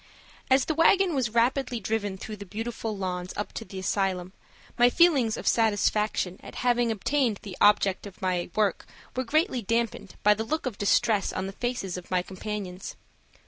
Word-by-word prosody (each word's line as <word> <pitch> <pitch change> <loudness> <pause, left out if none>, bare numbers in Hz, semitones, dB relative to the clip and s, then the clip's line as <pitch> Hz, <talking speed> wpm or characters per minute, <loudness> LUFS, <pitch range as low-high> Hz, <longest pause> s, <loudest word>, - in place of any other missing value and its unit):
AS 265 0 +4
the 315 - 0
wagon 350 +3 +4
was 260 -5 0
rapidly 245 +2 +1
driven 205 -3 -2
through 215 +2 -7
the 200 - -7
beautiful 225 +1 -4
lawns 180 -1 -3
up 205 - -4
to - - -5
the 195 - -10
asylum 190 -1 -1 0.4
my 245 0 +5
feelings 270 -8 +4
of - - -7
satisfaction 210 -3 +1
at - - -11
having 240 -1 +3
attained 230 +1 0
the 195 -3 -7
object 205 -1 +4
of 195 - -13
my 180 -2 -1
work 210 -2 0 0.3
were 255 - 0
greatly 310 - +1
dampened 230 -3 -2
by 210 - +6
the 220 +1 -3
look 310 +8 -2
of 240 -6 -4
distress 205 0 +2
on 185 - -3
the 195 - -6
faces 240 -6 -3
of 180 - -10
my 180 -1 +1
companions. 190 -1 -6
215 Hz, 180 wpm, -27 LUFS, 195-245 Hz, 0.4 s, by